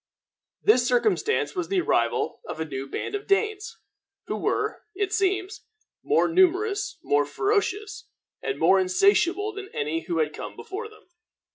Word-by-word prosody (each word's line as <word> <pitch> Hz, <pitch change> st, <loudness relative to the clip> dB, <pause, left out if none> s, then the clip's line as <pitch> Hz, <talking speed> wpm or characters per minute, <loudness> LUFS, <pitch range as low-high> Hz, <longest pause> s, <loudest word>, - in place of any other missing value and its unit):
This 255 Hz, -, +4 dB
circumstance 415 Hz, -, +1 dB
was 350 Hz, -3 st, -2 dB
the 390 Hz, -1 st, +1 dB
arrival -, -, 0 dB
of -, -, -6 dB
a 160 Hz, -, -1 dB
new 135 Hz, -3 st, -5 dB
band -, -, -4 dB
of 410 Hz, 0 st, -4 dB
Danes, 415 Hz, +1 st, 0 dB, 0.5 s
who -, -, -3 dB
were, -, -, -1 dB
it 385 Hz, -1 st, -1 dB
seems, 390 Hz, 0 st, -1 dB, 0.3 s
more 445 Hz, -, +2 dB
numerous, 375 Hz, +4 st, +2 dB
more 145 Hz, 0 st, +3 dB
ferocious, 405 Hz, -, -1 dB, 0.3 s
and 415 Hz, -, -3 dB
more 195 Hz, -, +5 dB
insatiable 380 Hz, -, +2 dB
than 400 Hz, 0 st, -8 dB
any 155 Hz, +3 st, -2 dB
who 170 Hz, -, -2 dB
had 155 Hz, -1 st, 0 dB
come -, -, -7 dB
before 435 Hz, +4 st, -6 dB
them. 430 Hz, -, -19 dB
385 Hz, 150 wpm, -25 LUFS, -, 0.5 s, more